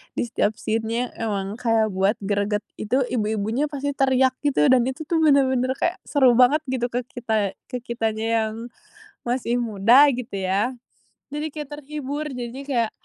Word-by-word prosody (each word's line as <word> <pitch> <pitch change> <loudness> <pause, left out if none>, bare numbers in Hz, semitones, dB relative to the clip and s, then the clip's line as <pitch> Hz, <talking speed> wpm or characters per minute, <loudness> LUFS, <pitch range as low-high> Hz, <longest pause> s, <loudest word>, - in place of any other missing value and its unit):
di - - -1
setiap 220 -2 0
scene-nya 225 +2 -2
emang 205 -1 -3
kayak 225 -2 +2
buat 195 +3 +2
greget, 205 +1 0 0.2
itu 250 +6 0
ibu-ibunya 220 +3 -1
pasti 285 0 -2
teriak 260 -1 +3
gitu 265 - +3
dan 255 -2 +5
itu 265 +4 -4
tuh 335 - +2
bener-bener 260 -4 +3
kayak 345 - -1
seru 265 -4 +4
banget 255 +5 +5
gitu 250 -2 -1
ke 245 +1 -1
kita 220 -5 -2
ke 250 -2 -4
kitanya 225 -2 -2 0.2
yang 215 - -6 0.7
masih 245 0 0
muda 230 +5 +5
gitu 245 -3 -6
ya, 200 +7 +1 0.6
jadi 300 +1 -2
kayak 300 -2 -6
terhibur. 290 +1 -5
Jadinya 250 0 -6
kayak, 235 -5 0
245 Hz, 155 wpm, -23 LUFS, 220-265 Hz, 0.7 s, dan